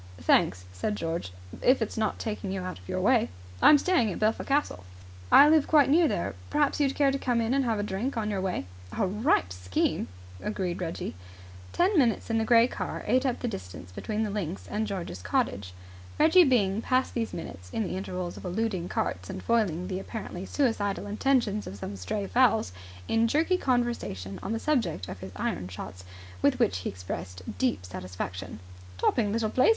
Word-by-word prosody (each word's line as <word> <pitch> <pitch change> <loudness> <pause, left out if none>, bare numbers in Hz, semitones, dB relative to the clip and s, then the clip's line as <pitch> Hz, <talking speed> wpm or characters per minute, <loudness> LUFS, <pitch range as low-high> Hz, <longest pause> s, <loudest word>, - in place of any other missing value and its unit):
"Thanks," 90 +2 +3
said 95 - -2
George. 165 - -3 0.3
"If 255 +2 +4
it's 225 - -2
not 220 -1 0
taking 210 -3 -4
you 190 -1 -2
out 185 - -5
your - - -2
way." - - +3 0.3
"I'm 300 - +8
staying 275 - +2
at - - -4
Belpher 215 +1 +1
Castle." 275 - 0 0.5
"I 285 - +9
live 310 -1 +4
quite 290 -3 +5
near 330 +2 +5
there. - - -1 0.2
Perhaps 295 -1 +1
you'd 275 -2 +2
care 280 -2 +3
to 275 - -2
come 245 -3 +1
in 230 +2 +1
and 275 -1 +2
have 225 -2 +1
a 205 - -1
drink 210 +6 -2
on 215 -1 -1
your 195 -2 -1
way?" 185 - -2 0.3
"A 210 - +2
ripe 195 - +1
scheme," 90 0 -1 0.3
agreed 185 -4 -2
Reggie 165 -2 -4 0.6
Ten 365 0 +3
minutes 235 -3 +1
in 225 - +2
the - - +1
grey 235 +1 +6
car - - -5
ate 255 +5 +2
up 250 - -2
the 245 - -1
distance 90 - -7
between 215 - -2
the 210 - -2
links 195 -3 -4
and 215 +1 -1
George's 175 - -5
cottage. 100 0 -1 0.5
Reggie 330 +3 +6
Byng 215 -6 +2
passed 255 +2 +1
these 230 -2 -2
minutes, 90 - -8
in 220 - -1
the 190 - -3
intervals 180 -2 -4
of - - -10
eluding 185 -1 -2
carts 95 0 -2
and - - -6
foiling 190 -7 +1
the 185 -1 -3
apparently 195 -3 -6
suicidal 210 -8 0
intentions 215 0 +1
of 95 - -6
some 100 +1 -6
stray 195 - -3
fowls, 225 - +3 0.4
in 225 +1 +3
jerky 320 +9 +2
conversation 240 - -1
on - - -4
the 225 - 0
subject 235 - 0
of 95 - -7
his 95 - -8
iron 90 -1 -2
shots, 90 0 -8 0.4
with - - +3
which 90 - +2
he 90 - -3
expressed 90 0 -6
a 90 - -7
deep 100 -2 -1
satisfaction. 90 0 -6 0.4
"Topping 210 - +2
little 220 0 0
place! 255 - +4
210 Hz, 195 wpm, -28 LUFS, 150-245 Hz, 0.6 s, I